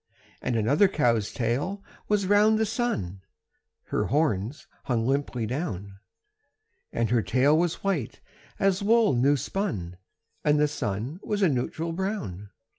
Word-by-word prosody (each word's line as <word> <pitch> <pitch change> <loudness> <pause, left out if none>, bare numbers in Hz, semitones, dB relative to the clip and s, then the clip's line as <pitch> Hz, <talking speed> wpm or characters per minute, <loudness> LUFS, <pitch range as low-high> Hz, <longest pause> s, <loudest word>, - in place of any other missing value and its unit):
And 125 - -1
another 140 - +4
cow's 120 - +1
tail 145 - -2 0.2
was 205 -2 +1
round 210 +2 +4
the 220 - +2
sun 105 - -2 0.7
(Her - - 0
horns 135 -3 0 0.2
hung 115 -3 0
limply 135 -3 0
down); 100 - -4 0.9
And 115 -1 -1
her 120 -2 +3
tail 130 +7 +3
was 170 +1 0
white 180 - -1 0.4
as 195 -1 +2
wool 225 -2 +4
new 135 +4 +3
spun, 105 - -3 0.5
And 150 0 +3
the 150 - +4
sun 125 - -3
was 205 -1 -1
a 185 - +5
neutral 155 +5 -2
brown. 175 - -4
145 Hz, 135 wpm, -26 LUFS, -, 0.9 s, a